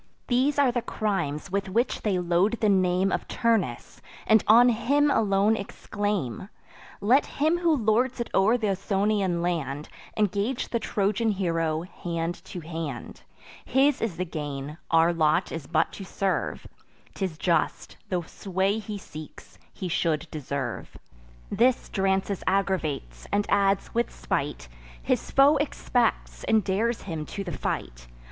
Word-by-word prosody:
These 265 Hz, +4 st, +2 dB
are 280 Hz, -3 st, +4 dB
the 240 Hz, 0 st, -1 dB
crimes 195 Hz, -8 st, -2 dB
with 195 Hz, 0 st, -1 dB
which 230 Hz, +6 st, 0 dB
they 205 Hz, -4 st, +1 dB
load 180 Hz, +4 st, +2 dB
the 215 Hz, -, +3 dB
name 185 Hz, 0 st, +2 dB
Of -, -, -2 dB
Turnus, 210 Hz, -, -1 dB, 0.2 s
and 220 Hz, -1 st, +5 dB
on 235 Hz, +3 st, +8 dB
him 285 Hz, +5 st, +2 dB
alone 205 Hz, -1 st, +3 dB
exclaim: 205 Hz, -, -3 dB, 0.5 s
"Let 250 Hz, +8 st, +4 dB
him 315 Hz, +4 st, +2 dB
who 335 Hz, -3 st, +3 dB
lords 245 Hz, +1 st, +1 dB
it 235 Hz, -, -2 dB
o'er 210 Hz, +5 st, +4 dB
th' 235 Hz, -, -12 dB
Ausonian 195 Hz, -2 st, +1 dB
land 150 Hz, -4 st, -2 dB, 0.3 s
Engage 210 Hz, +4 st, 0 dB
the 235 Hz, -, 0 dB
Trojan 210 Hz, +1 st, 0 dB
hero 165 Hz, -5 st, 0 dB
hand 175 Hz, -2 st, -4 dB
to 180 Hz, -, -7 dB
hand: 160 Hz, -6 st, -6 dB, 0.4 s
His 270 Hz, +2 st, +2 dB
is 210 Hz, -7 st, -2 dB
the 185 Hz, -, -1 dB
gain; 150 Hz, -2 st, -5 dB
our 165 Hz, +1 st, +4 dB
lot 160 Hz, +2 st, +2 dB
is 160 Hz, -5 st, -6 dB
but 160 Hz, -1 st, +1 dB
to 195 Hz, -, -7 dB
serve; 195 Hz, +1 st, -2 dB, 0.5 s
'Tis 185 Hz, -5 st, -3 dB
just, 165 Hz, -2 st, 0 dB
the 180 Hz, -2 st, -1 dB
sway 190 Hz, +4 st, -1 dB
he 210 Hz, -1 st, -6 dB
seeks, 155 Hz, -5 st, -11 dB
he 185 Hz, -, -5 dB
should 165 Hz, -2 st, 0 dB
deserve." 140 Hz, -4 st, -4 dB, 0.5 s
This 250 Hz, +1 st, +2 dB
Drances 195 Hz, 0 st, 0 dB
aggravates; 160 Hz, -, -1 dB
and 205 Hz, 0 st, +1 dB
adds, 195 Hz, -1 st, +2 dB
with 235 Hz, +1 st, 0 dB
spite: -, -, -3 dB, 0.4 s
"His -, -, 0 dB
foe 280 Hz, +2 st, +5 dB
expects, 250 Hz, -4 st, -1 dB
and 220 Hz, -2 st, +3 dB
dares 215 Hz, +6 st, 0 dB
him 165 Hz, -5 st, -4 dB
to 200 Hz, -, -5 dB
the 180 Hz, -, -5 dB
fight." -, -, -4 dB
195 Hz, 145 wpm, -26 LUFS, 165-220 Hz, 0.5 s, on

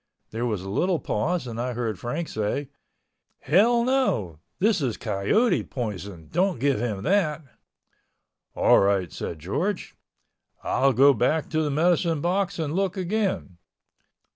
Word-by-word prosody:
There 115 Hz, +2 st, -2 dB
was 105 Hz, -5 st, -2 dB
a 95 Hz, -, -6 dB
little 180 Hz, -, +1 dB
pause 160 Hz, +7 st, -1 dB
and 115 Hz, -1 st, -5 dB
I 125 Hz, 0 st, -2 dB
heard 115 Hz, -5 st, -3 dB
Frank 150 Hz, +8 st, -3 dB
say, 110 Hz, +6 st, -2 dB, 0.7 s
"Hell 230 Hz, -, +4 dB
no, 235 Hz, -, 0 dB, 0.2 s
this 210 Hz, -2 st, +2 dB
is 125 Hz, -5 st, -1 dB
coyote 110 Hz, -, +1 dB
poison, 100 Hz, -, -6 dB
don't 185 Hz, 0 st, +1 dB
give 140 Hz, -2 st, +1 dB
him 105 Hz, -4 st, -3 dB
that." 165 Hz, -6 st, +1 dB, 1.1 s
"All -, -, +5 dB
right," 95 Hz, -3 st, +1 dB
George 140 Hz, -, -3 dB
said, -, -, -30 dB, 0.7 s
"I'll 135 Hz, +1 st, +3 dB
go 140 Hz, +4 st, +6 dB
back 140 Hz, +6 st, 0 dB
to 155 Hz, -, +1 dB
the 150 Hz, -, 0 dB
medicine 165 Hz, +2 st, +2 dB
box 185 Hz, +4 st, 0 dB
and 155 Hz, -3 st, -2 dB
look 195 Hz, +2 st, -1 dB
again." 190 Hz, -, -2 dB
145 Hz, 140 wpm, -25 LUFS, 110-180 Hz, 1.1 s, go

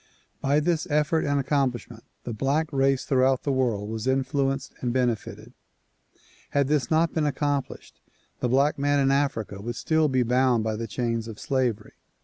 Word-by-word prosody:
By 140 Hz, +2 st, +2 dB
this 170 Hz, +2 st, 0 dB
effort 150 Hz, +2 st, +1 dB
and 145 Hz, 0 st, +1 dB
accomplishment 130 Hz, -4 st, -1 dB, 0.2 s
the 120 Hz, -, -5 dB
black 145 Hz, +7 st, -1 dB
race 135 Hz, -1 st, +2 dB
throughout 130 Hz, -1 st, +2 dB
the 140 Hz, -, 0 dB
world 120 Hz, -6 st, 0 dB
was 110 Hz, +2 st, -4 dB
influenced 135 Hz, 0 st, 0 dB
and 125 Hz, -, -1 dB
benefited. 120 Hz, -3 st, -2 dB, 1.0 s
Had 140 Hz, -1 st, +1 dB
this 145 Hz, -5 st, +1 dB
not 160 Hz, +1 st, +2 dB
been 155 Hz, -2 st, +1 dB
accomplished 145 Hz, -1 st, -3 dB, 0.4 s
the 125 Hz, -, -1 dB
black 140 Hz, +4 st, +2 dB
man 145 Hz, 0 st, +2 dB
in 135 Hz, -1 st, +3 dB
Africa 135 Hz, -8 st, -1 dB
would 120 Hz, +3 st, -4 dB
still 160 Hz, +4 st, +1 dB
be 130 Hz, -2 st, +2 dB
bound 125 Hz, -1 st, +2 dB
by 110 Hz, 0 st, -1 dB
the 115 Hz, +1 st, -4 dB
chains 115 Hz, 0 st, -2 dB
of 110 Hz, -2 st, -8 dB
slavery. 125 Hz, -6 st, -1 dB
135 Hz, 165 wpm, -25 LUFS, 120-145 Hz, 1.0 s, in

